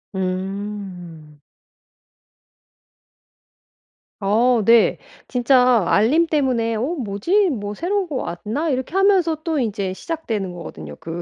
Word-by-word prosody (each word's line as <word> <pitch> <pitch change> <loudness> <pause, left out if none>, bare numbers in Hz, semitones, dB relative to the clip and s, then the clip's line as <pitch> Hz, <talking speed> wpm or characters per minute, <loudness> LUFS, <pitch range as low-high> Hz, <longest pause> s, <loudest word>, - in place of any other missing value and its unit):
음. 185 -4 -5 2.8
어 225 +4 +2
네. 230 0 +5 0.3
진짜 250 -2 +3
알림 290 +11 +3
때문에 255 -7 0
'어 215 - -2
뭐지? 335 - +1
뭐 205 -6 -4
새로운 380 - -1
거 300 - -5
왔나?' 240 - -3
이렇게 260 +4 -2
하면서 385 -4 +3
또 320 -4 -1
인제 200 -5 -2
시작되는 220 - -4
거 175 -1 -8
거든요 75 - -9
그 165 +1 -6
230 Hz, 205 characters per minute, -21 LUFS, 195-300 Hz, 2.8 s, 네